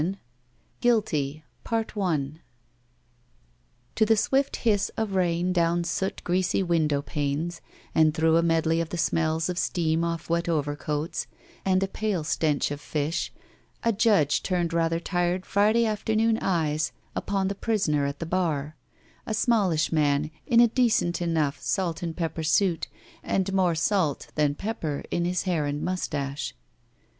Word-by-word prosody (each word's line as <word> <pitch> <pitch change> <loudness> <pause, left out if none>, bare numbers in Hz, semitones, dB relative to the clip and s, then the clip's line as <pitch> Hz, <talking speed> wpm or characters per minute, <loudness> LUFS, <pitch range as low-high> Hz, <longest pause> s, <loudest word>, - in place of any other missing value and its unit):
1 185 +5 -1 0.6
GUILTY 155 - +1 0.2
I - - -13
GUILTY 160 -8 -2 1.5
TO - - +2
the 220 0 +4
swift 270 +6 +1
hiss 210 -4 +1
of 220 -3 -1
rain 180 -1 +1
down 170 0 +2
soot 170 +3 -2
greasy 185 +2 +1
window 155 -5 +1
panes 150 +4 -2 0.3
and 155 -1 +5
through 160 +1 +2
a - - +4
medley 165 0 +2
of 165 - -4
the 175 - -4
smells 160 0 +1
of 180 0 -2
steam 165 -1 0
off 170 -1 -3
wet 170 +1 0
overcoats 150 0 -2 0.4
and 190 0 +2
a - - 0
pale 200 -4 -2
stench 150 -2 0
of 145 0 -5
fish, 150 +3 -2 0.5
a 230 -1 +2
judge 200 - +3
turned 175 -3 -1
rather 165 0 +1
tired 175 +1 -1
Friday 215 +3 +3
afternoon 220 +1 +1
eyes 155 -4 0 0.2
upon 195 -1 -1
the 200 - -1
prisoner 180 -10 0
at 140 - -4
the 165 - -4
bar, 155 -4 -1 0.5
a 220 - -1
smallish 200 -9 +2
man 150 -1 +1 0.2
in 235 -2 +4
a 240 - +8
decent 225 -8 +1
enough 155 -5 0
salt 180 -3 -1
and 165 -2 -4
pepper 165 -1 -2
suit 165 +2 +2 0.3
and 195 0 -1
more 185 -3 +2
salt 165 -2 0
than 150 -2 +1
pepper 165 -8 -3
in 170 - 0
his 180 0 0
hair 170 -6 0
and 145 +1 -3
mustache. 145 -6 -3
170 Hz, 150 wpm, -26 LUFS, 155-195 Hz, 1.5 s, a